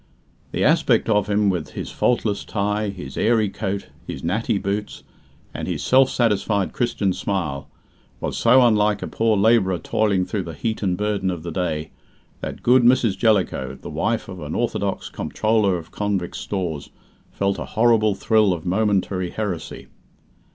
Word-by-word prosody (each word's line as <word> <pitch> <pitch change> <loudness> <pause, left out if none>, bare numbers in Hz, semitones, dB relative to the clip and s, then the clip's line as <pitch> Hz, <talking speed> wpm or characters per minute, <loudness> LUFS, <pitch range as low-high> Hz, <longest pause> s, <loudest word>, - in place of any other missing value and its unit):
The - - -1
aspect - - +3
of 105 -2 +2
him, 105 -1 +3
with 85 -4 -4
his - - -5
faultless 110 -4 0
tie, 105 0 -1
his 75 -9 -8
airy 110 -3 +2
coat, 100 -1 -4 0.2
his 65 - -6
natty 105 +6 0
boots, 100 +2 -3 0.5
and - - -5
his - - -3
self 130 +1 +5
satisfied 105 -4 0
Christian 105 -6 0
smile, 75 -10 -3 0.5
was - - -3
so 125 +2 +5
unlike 105 -2 +2
a - - -3
poor 110 -2 +1
labourer 100 -3 +3
toiling 100 0 0
through 100 - -2
the 85 -3 -7
heat 110 +7 -3
and 95 -3 0
burden 105 -2 -1
of 85 -3 -4
the 85 - -5
day, 80 -4 -2 0.5
that - - -6
good 125 +1 +5
Mrs. 120 -4 +4
Jellicoe, 100 - +1
the - - -8
wife 115 0 -1
of 95 -2 -8
an 75 - -5
orthodox - - -1
Comptroller 105 -4 0
of 80 -1 -10
Convicts' 100 -4 -2
Stores, 85 -8 -4 0.4
felt 100 0 -1
a - - -4
horrible 110 -3 +4
thrill 105 -1 +3
of 80 -2 -6
momentary 95 -2 0
heresy. 100 -6 -5
100 Hz, 160 wpm, -22 LUFS, 90-110 Hz, 0.5 s, self